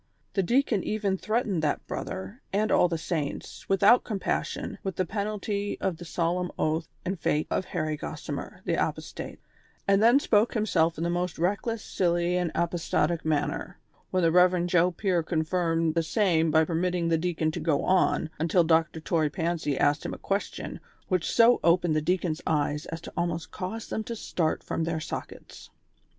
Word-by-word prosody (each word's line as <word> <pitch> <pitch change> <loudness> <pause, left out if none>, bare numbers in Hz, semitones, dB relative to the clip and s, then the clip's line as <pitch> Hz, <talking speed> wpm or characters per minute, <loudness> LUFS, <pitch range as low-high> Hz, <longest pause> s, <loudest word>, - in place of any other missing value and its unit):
The 195 - +2
deacon 235 0 +2
even 205 -3 0
threatened 215 -3 -1
that 150 -1 -1
brother, 195 +6 -6
and 210 +2 +1
all - - +5
the 170 -1 -2
saints, 155 -3 -4
without 200 +5 +5
compassion, 205 -4 -3
with 190 -2 -4
the 185 - 0
penalty 205 +1 -3
of 185 -4 -1
the 175 - -9
solemn 175 +2 -1
oath 160 +1 0 0.2
and 185 0 -2
fate 150 0 +1
of 185 - 0
Harry 155 -3 -2
Gossimer, - - -6
the - - 0
apostate; - - -5 0.5
and 195 0 +4
then 235 +5 +6
spoke 220 -4 +2
himself 170 -7 +2
in 165 - -2
the 170 - 0
most 175 0 -2
reckless, 205 +6 -1
silly 175 -1 +1
and 180 -2 0
apostatic 170 -1 0
manner; 150 -2 -1 0.3
when 185 -1 +1
the 165 - +4
Rev. 180 0 +4
Joe 175 0 +3
Pier 180 -1 0
confirmed 165 0 0
the 165 - +2
same 165 -2 +2
by 160 +1 +4
permitting 175 +1 0
the 165 - +3
deacon 160 -2 0
to 170 - -4
go 155 -3 +1
on, 185 -3 +2
until 170 +2 +3
Dr. 160 0 +2
Toy 155 -1 +1
Pancy 160 -3 -1
asked 145 +1 +2
him - - -4
a - - -10
question, 200 +1 -3 0.3
which 185 -3 +1
so 235 +1 +6
opened 170 -1 +3
the 155 - +2
deacon's 175 -1 0
eyes 150 -1 0
as 165 0 -6
to - - -10
almost 170 -1 -2
cause 215 +5 -5
them 220 - -2
to 235 - -4
start 165 -7 -1
from 165 - -2
their 165 -1 -1
sockets. - - -8
175 Hz, 175 wpm, -27 LUFS, 160-195 Hz, 0.5 s, then